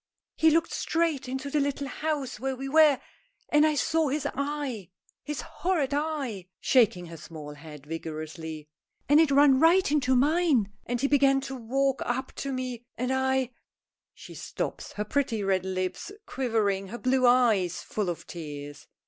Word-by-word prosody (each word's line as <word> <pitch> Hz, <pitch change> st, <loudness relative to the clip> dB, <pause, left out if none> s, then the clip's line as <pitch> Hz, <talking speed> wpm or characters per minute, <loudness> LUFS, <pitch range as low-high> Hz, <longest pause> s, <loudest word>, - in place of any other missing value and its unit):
"He 320 Hz, -, +4 dB
looked 330 Hz, +1 st, +2 dB
straight 320 Hz, -6 st, 0 dB
into 265 Hz, +2 st, -4 dB
the 300 Hz, -, +2 dB
little 280 Hz, 0 st, -1 dB
house 290 Hz, -6 st, -3 dB
where 265 Hz, +2 st, -2 dB
we 270 Hz, +1 st, -5 dB
were, 305 Hz, -1 st, +5 dB, 0.5 s
and 300 Hz, +1 st, +5 dB
I 305 Hz, -, +1 dB
saw 315 Hz, +3 st, +1 dB
his 290 Hz, +1 st, -1 dB
eye 280 Hz, -, -3 dB, 0.3 s
his 295 Hz, -1 st, -4 dB
horrid 330 Hz, -7 st, -1 dB
eye!" 285 Hz, -, -2 dB
shaking 215 Hz, -9 st, +3 dB
her 165 Hz, -1 st, -9 dB
small 150 Hz, -2 st, -9 dB
head 150 Hz, -1 st, -12 dB
vigorously 155 Hz, 0 st, -6 dB, 0.4 s
"and 290 Hz, +2 st, +6 dB
it 320 Hz, -2 st, +5 dB
ran 280 Hz, -1 st, +5 dB
right 335 Hz, +1 st, +5 dB
into 260 Hz, -3 st, +2 dB
mine, 285 Hz, -, +3 dB, 0.2 s
and 245 Hz, 0 st, -1 dB
he 275 Hz, -, +2 dB
began 275 Hz, -1 st, +4 dB
to 270 Hz, 0 st, -6 dB
walk 265 Hz, +3 st, 0 dB
up 260 Hz, +2 st, -2 dB
to 275 Hz, -, -3 dB
me, 255 Hz, -2 st, -4 dB
and 250 Hz, +2 st, -1 dB
I 265 Hz, -1 st, +1 dB, 0.3 s
" -, -, -66 dB
She -, -, -11 dB
stops, -, -, -5 dB
her 210 Hz, -, -3 dB
pretty 230 Hz, -3 st, 0 dB
red 190 Hz, -1 st, +1 dB
lips 185 Hz, -, -3 dB
quivering, 215 Hz, -6 st, 0 dB
her 230 Hz, +5 st, -6 dB
blue 255 Hz, 0 st, +2 dB
eyes 220 Hz, -8 st, +3 dB
full 210 Hz, -4 st, -2 dB
of 170 Hz, -, -5 dB
tears. 145 Hz, -3 st, -8 dB
260 Hz, 165 wpm, -27 LUFS, 195-285 Hz, 0.5 s, and